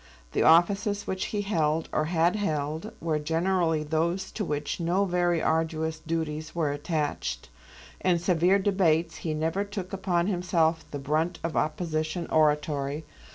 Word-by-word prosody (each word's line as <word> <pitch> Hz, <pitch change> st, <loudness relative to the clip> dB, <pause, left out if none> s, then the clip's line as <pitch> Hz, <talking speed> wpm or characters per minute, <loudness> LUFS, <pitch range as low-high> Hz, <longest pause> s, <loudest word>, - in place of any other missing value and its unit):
The -, -, 0 dB
offices 200 Hz, +5 st, +4 dB
which 190 Hz, 0 st, -2 dB
he 205 Hz, -1 st, -2 dB
held, 160 Hz, -5 st, 0 dB
or 155 Hz, -, +1 dB
had 170 Hz, +3 st, +2 dB
held, 160 Hz, 0 st, -2 dB
were 160 Hz, -2 st, 0 dB
generally 165 Hz, 0 st, +1 dB
those 170 Hz, +5 st, -1 dB
to 215 Hz, -, -3 dB
which 150 Hz, -3 st, -3 dB
no 175 Hz, +4 st, +1 dB
very 175 Hz, -2 st, +1 dB
arduous 160 Hz, 0 st, 0 dB
duties 155 Hz, -1 st, -3 dB
were 160 Hz, -4 st, +1 dB
attached. 145 Hz, -, -3 dB, 0.5 s
In 180 Hz, -2 st, +2 dB
severe 175 Hz, +2 st, +3 dB
debates 175 Hz, -5 st, +1 dB
he 155 Hz, -2 st, -3 dB
never 165 Hz, +6 st, 0 dB
took 200 Hz, -3 st, -6 dB
upon 185 Hz, -3 st, 0 dB
himself 175 Hz, -4 st, +1 dB
the 145 Hz, -, -5 dB
brunt 155 Hz, +5 st, 0 dB
of 165 Hz, -1 st, -2 dB
opposition 155 Hz, +1 st, -1 dB
oratory. 150 Hz, -1 st, +1 dB
165 Hz, 145 wpm, -27 LUFS, 155-180 Hz, 0.5 s, offices